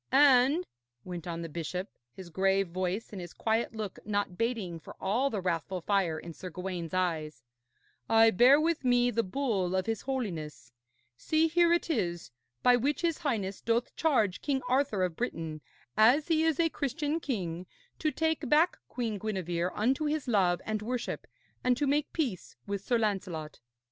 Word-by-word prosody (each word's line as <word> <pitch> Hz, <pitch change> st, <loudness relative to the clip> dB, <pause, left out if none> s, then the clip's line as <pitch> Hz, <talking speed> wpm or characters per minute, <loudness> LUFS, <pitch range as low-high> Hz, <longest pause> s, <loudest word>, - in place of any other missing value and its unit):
'And,' 275 Hz, +4 st, +5 dB, 0.4 s
went 175 Hz, -2 st, -7 dB
on 170 Hz, -1 st, -4 dB
the -, -, -4 dB
bishop, 170 Hz, +4 st, -4 dB, 0.2 s
his 175 Hz, +6 st, -11 dB
grave 195 Hz, +2 st, +2 dB
voice 185 Hz, +4 st, -2 dB
and 200 Hz, -3 st, -6 dB
his 175 Hz, -1 st, -9 dB
quiet 225 Hz, +1 st, 0 dB
look 215 Hz, -3 st, -5 dB
not 205 Hz, -3 st, -1 dB
bating 215 Hz, -7 st, -2 dB
for -, -, -12 dB
all 235 Hz, +8 st, +1 dB
the 210 Hz, -6 st, -3 dB
wrathful 180 Hz, +1 st, -2 dB
fire 180 Hz, -3 st, +1 dB
in 170 Hz, +1 st, -8 dB
Sir 185 Hz, -, -8 dB
Gawaine's 180 Hz, -1 st, -5 dB
eyes, 155 Hz, -7 st, -1 dB, 0.7 s
'I 225 Hz, 0 st, +6 dB
bear 250 Hz, +8 st, +6 dB
with 320 Hz, -1 st, 0 dB
me 245 Hz, -1 st, +3 dB
the 230 Hz, 0 st, +2 dB
bull 195 Hz, -5 st, -1 dB
of 185 Hz, -, 0 dB
his 225 Hz, -2 st, -2 dB
Holiness 165 Hz, -, -4 dB, 0.5 s
see, 315 Hz, -, +2 dB
here 340 Hz, +1 st, +3 dB
it 345 Hz, -, +2 dB
is 175 Hz, -, -2 dB, 0.3 s
by 250 Hz, 0 st, +6 dB
which 275 Hz, +5 st, 0 dB
his 335 Hz, -2 st, +1 dB
Highness 210 Hz, -, -2 dB
doth 230 Hz, +1 st, 0 dB
charge 235 Hz, -, +1 dB
King 270 Hz, -3 st, -1 dB
Arthur 255 Hz, -6 st, +1 dB
of 180 Hz, -3 st, -1 dB
Britain, 160 Hz, -9 st, -4 dB, 0.3 s
as 255 Hz, +9 st, +5 dB
he 320 Hz, -1 st, +3 dB
is 320 Hz, -2 st, +1 dB
a 335 Hz, -, +4 dB
Christian 295 Hz, +2 st, -2 dB
king, 185 Hz, -, -3 dB, 0.3 s
to 310 Hz, -, +1 dB
take 320 Hz, -3 st, -1 dB
back 320 Hz, +4 st, +4 dB
Queen 230 Hz, -5 st, -3 dB
Gwenevere 180 Hz, -4 st, -2 dB
unto 260 Hz, +8 st, +1 dB
his 300 Hz, -2 st, -1 dB
love 185 Hz, -6 st, +2 dB
and 215 Hz, -1 st, -2 dB
worship, 240 Hz, +2 st, -4 dB, 0.4 s
and 250 Hz, -1 st, +3 dB
to 290 Hz, -, +1 dB
make 290 Hz, +1 st, +1 dB
peace 250 Hz, -, -3 dB
with 200 Hz, -1 st, -3 dB
Sir 240 Hz, -, +2 dB
Lancelot.' 185 Hz, -8 st, -2 dB
215 Hz, 175 wpm, -30 LUFS, 180-270 Hz, 0.7 s, I